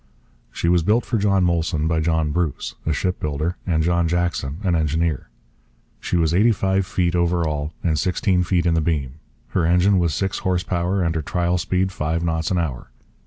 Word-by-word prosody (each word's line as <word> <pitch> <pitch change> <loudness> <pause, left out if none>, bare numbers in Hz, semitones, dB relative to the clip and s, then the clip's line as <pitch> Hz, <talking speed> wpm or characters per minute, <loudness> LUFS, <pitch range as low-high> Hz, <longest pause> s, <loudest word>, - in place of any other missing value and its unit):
She - - -2
was 85 0 +4
built 105 +8 +2
for 115 - -1
John 100 -2 +2
Molson 85 -2 0
by 80 0 +1
John 80 -1 0
Bruce, 85 -3 -2
a - - +2
shipbuilder, 80 -1 -2
and 80 -3 +1
John 85 0 +2
Jackson, 85 -4 -1
an 95 -3 +1
engineer. 80 -1 -1 0.7
She - - -1
was 80 -1 +2
eighty 105 +6 +4
five 95 -2 0
feet 90 -3 0
over 85 -1 +1
all 75 0 -3
and 80 -3 +1
sixteen 90 - +1
feet 90 -1 +1
in 85 - +3
the 80 - +2
beam. 75 -3 -2 0.3
Her 90 - 0
engine 90 +4 +3
was 85 -5 0
six 95 +4 -1
horse 90 -1 0
power, 90 +2 -1
and 85 -1 0
her 80 - -1
trial 90 +3 0
speed 95 +1 0
five 80 0 -2
knots 80 -1 -1
an 95 - 0
hour. 75 -9 -3
85 Hz, 195 wpm, -22 LUFS, 80-90 Hz, 0.7 s, was